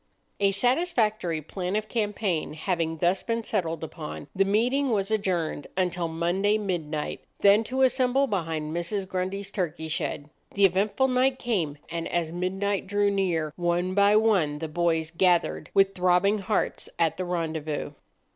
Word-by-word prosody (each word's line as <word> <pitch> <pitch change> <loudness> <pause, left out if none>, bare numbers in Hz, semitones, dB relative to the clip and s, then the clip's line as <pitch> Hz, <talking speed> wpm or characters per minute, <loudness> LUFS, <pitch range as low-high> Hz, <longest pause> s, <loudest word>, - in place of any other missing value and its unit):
A 200 -1 +4
satisfactory 215 - +1
plan 180 +4 -4
of 215 0 -1
campaign 205 -8 -1
having 165 -1 -1
thus 175 +4 +1
been 230 0 -2
settled 165 -7 -2
upon, 155 -2 -7
the 195 - +4
meeting 245 +8 +1
was 205 -2 0
adjourned 180 -8 -1
until 180 -2 0
Monday 175 +6 +1
midnight, 165 -7 -3 0.2
then 205 +2 +6
to 265 +2 0
assemble 260 +1 +3
behind 160 - -2
Mrs. 190 +3 -2
Grundy's 190 +2 -3
turkey 165 -5 -3
shed. 150 -2 -3 0.2
The 200 0 +5
eventful 200 +8 +2
night 255 +1 +2
came; 180 - -1
and 165 0 -4
as 170 -2 -1
midnight 190 +3 -2
drew 205 0 +2
near, 170 -6 0
one 175 +1 0
by 200 +1 +5
one 195 -10 +3
the 160 +1 -4
boys 160 0 0
gathered 175 0 +1
with 195 0 +4
throbbing 185 +3 +3
hearts 205 +1 -1
at 165 -2 +1
the 185 - -2
rendezvous. 160 -4 -3
185 Hz, 150 wpm, -26 LUFS, 165-210 Hz, 0.2 s, then